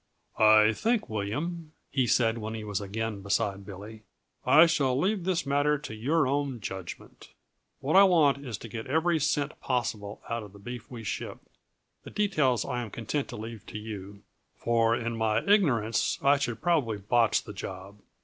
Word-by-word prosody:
"I 110 Hz, 0 st, +6 dB
think, 230 Hz, -, 0 dB
William," 150 Hz, +11 st, -4 dB, 0.2 s
he 130 Hz, -3 st, +1 dB
said, 115 Hz, 0 st, +2 dB
when 110 Hz, +1 st, -5 dB
he 110 Hz, -, -6 dB
was 105 Hz, -2 st, -3 dB
again 105 Hz, +1 st, -4 dB
beside 100 Hz, 0 st, -1 dB
Billy, 105 Hz, +2 st, -9 dB, 0.4 s
"I 160 Hz, +3 st, +7 dB
shall 140 Hz, -6 st, +1 dB
leave 190 Hz, +2 st, 0 dB
this 180 Hz, -3 st, 0 dB
matter 145 Hz, +2 st, +2 dB
to 140 Hz, -, -8 dB
your 140 Hz, +9 st, +1 dB
own 140 Hz, -2 st, -1 dB
judgment. 95 Hz, -3 st, -8 dB, 0.5 s
What 140 Hz, +6 st, 0 dB
I 195 Hz, -, +9 dB
want 150 Hz, -7 st, +3 dB
is 120 Hz, -6 st, -5 dB
to 115 Hz, -, -9 dB
get 110 Hz, 0 st, -7 dB
every 160 Hz, +4 st, +2 dB
cent 145 Hz, 0 st, -1 dB
possible 110 Hz, -5 st, -2 dB
out 115 Hz, 0 st, -2 dB
of 105 Hz, -2 st, -11 dB
the -, -, -13 dB
beef 120 Hz, +3 st, -8 dB
we 120 Hz, -3 st, -8 dB
ship; 100 Hz, -, -4 dB, 0.7 s
the -, -, -9 dB
details 155 Hz, -, +1 dB
I 125 Hz, -2 st, -2 dB
am 115 Hz, -, -6 dB
content 120 Hz, +7 st, -3 dB
to -, -, -8 dB
leave 110 Hz, -1 st, -7 dB
with -, -, -10 dB
you, 105 Hz, -2 st, -7 dB, 0.3 s
for 115 Hz, -1 st, +2 dB
in 120 Hz, -1 st, -3 dB
my 110 Hz, -1 st, +1 dB
ignorance 120 Hz, -, +2 dB
I 140 Hz, +1 st, +5 dB
should 120 Hz, -5 st, -3 dB
probably 150 Hz, -11 st, +1 dB
botch 115 Hz, +3 st, +2 dB
the 105 Hz, -, -9 dB
job. 95 Hz, +1 st, -8 dB
115 Hz, 180 wpm, -28 LUFS, 105-145 Hz, 0.7 s, I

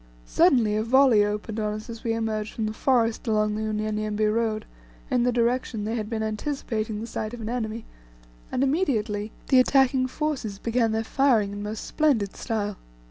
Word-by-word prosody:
Suddenly, 210 Hz, -, +3 dB
a -, -, +1 dB
volley 250 Hz, -2 st, +5 dB
opened 210 Hz, +1 st, -3 dB
on 210 Hz, -1 st, -1 dB
us 215 Hz, 0 st, -8 dB
as 230 Hz, -1 st, -8 dB
we 230 Hz, -, 0 dB
emerged 220 Hz, -2 st, -2 dB
from 220 Hz, -, -1 dB
the 215 Hz, -, -2 dB
forest 235 Hz, -1 st, +1 dB
along 215 Hz, -1 st, +2 dB
the 215 Hz, +1 st, -2 dB
Unyanyembe 215 Hz, 0 st, -1 dB
road, 220 Hz, -1 st, -1 dB, 0.5 s
in 245 Hz, -, +3 dB
the 250 Hz, +1 st, +2 dB
direction 235 Hz, -2 st, 0 dB
they 220 Hz, -, -2 dB
had 215 Hz, -3 st, -3 dB
been 225 Hz, -2 st, -2 dB
anticipating 220 Hz, -1 st, -3 dB
the -, -, -4 dB
sight 220 Hz, 0 st, -4 dB
of 235 Hz, -, -9 dB
an 220 Hz, -, -4 dB
enemy, 230 Hz, -2 st, -3 dB, 0.7 s
and 255 Hz, -, +1 dB
immediately 225 Hz, -, 0 dB, 0.2 s
the 260 Hz, -, +6 dB
attacking 260 Hz, 0 st, +3 dB
forces 260 Hz, -8 st, -3 dB
began 230 Hz, +1 st, +1 dB
their 220 Hz, 0 st, 0 dB
firing 230 Hz, -5 st, +2 dB
in 205 Hz, 0 st, -6 dB
most 210 Hz, +1 st, -5 dB
splendid 260 Hz, -11 st, +1 dB
style. 210 Hz, -4 st, -3 dB
220 Hz, 185 wpm, -25 LUFS, 215-245 Hz, 0.7 s, the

